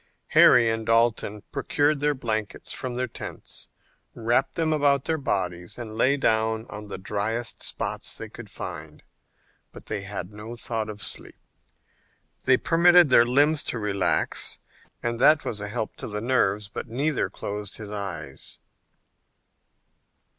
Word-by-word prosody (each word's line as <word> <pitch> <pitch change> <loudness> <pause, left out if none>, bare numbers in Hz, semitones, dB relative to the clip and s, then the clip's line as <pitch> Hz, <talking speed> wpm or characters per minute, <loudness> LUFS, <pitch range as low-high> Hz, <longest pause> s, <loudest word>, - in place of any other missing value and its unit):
Harry 120 -2 +7
and 110 0 -1
Dalton 115 -3 +2
procured 145 +1 +1
their 145 0 +1
blankets 110 -5 -3
from 125 -1 -4
their 125 +1 0
tents, - - -7 0.5
wrapped 120 +4 +1
them 160 -1 +1
about 140 -3 +3
their 160 -1 0
bodies 90 -8 -2
and 110 -3 -7
lay 130 +5 +3
down 110 -2 +1
on 105 0 -7
the - - -6
dryest 105 +5 -2
spots - - -2
they - - -6
could - - -11
find, 75 0 -7 0.7
but - - -12
they 100 - -3
had 100 -1 -6
no 110 +3 -8
thought 115 -2 -3
of 105 -1 -7
sleep. - - -4 1.1
They 130 -1 +6
permitted 175 -1 +5
their 120 -1 +7
limbs 145 +4 +4
to - - -3
relax, 100 -3 0 0.5
and 120 0 -1
that 150 +4 +5
was 105 -2 -2
a 105 - -3
help 110 +1 -3
to - - -6
the 105 -1 -3
nerves, 105 -4 +1
but 100 - -6
neither 140 +6 0
closed 105 0 -6
his 105 -2 -8
eyes. 90 -9 -5
115 Hz, 145 wpm, -26 LUFS, 105-130 Hz, 1.1 s, Harry